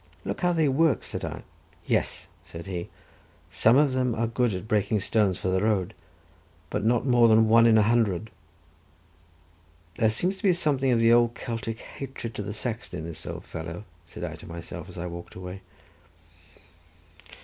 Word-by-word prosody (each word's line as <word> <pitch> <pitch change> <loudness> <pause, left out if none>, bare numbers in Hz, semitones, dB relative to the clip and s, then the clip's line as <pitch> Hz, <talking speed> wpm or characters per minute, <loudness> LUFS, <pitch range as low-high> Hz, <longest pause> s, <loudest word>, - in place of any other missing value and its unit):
"Look - - -4
how 175 -1 +3
they 160 -3 +2
work," 140 -1 +2
said - - -6
I. - - -5 0.4
"Yes," - - -1 0.2
said 85 0 -9
he, 90 -3 -5 0.6
"some 115 +4 +4
of 145 -2 +4
them 125 -2 0
are 115 - 0
good 120 +1 +1
at 95 +3 -6
breaking 105 0 +1
stones 100 -2 +1
for 95 - -2
the 95 0 +1
road, 105 -2 +1 0.8
but 105 - -1
not 115 +2 +2
more 120 -3 +5
than 110 0 +5
one 115 +1 +6
in 110 -1 +6
a 110 - +5
hundred." 110 -3 +1 1.7
"There 110 -3 +3
seems 180 - 0
to - - -14
be 190 -3 +5
something 140 -6 +1
of 120 - +3
the 115 0 +5
old 120 0 +4
Celtic 115 -1 -4
hatred 135 -4 -7
to 105 - -4
the 105 0 -5
Saxon 110 -3 -4
in 80 - -6
this 80 -1 -8
old - - -6
fellow," 85 +4 -6 0.2
said 85 - -9
I 80 -2 -5
to - - -13
myself, 85 0 -8
as - - -11
I 85 - -4
walked 85 0 -8
away. 90 +1 -7
110 Hz, 180 wpm, -26 LUFS, 95-120 Hz, 1.7 s, one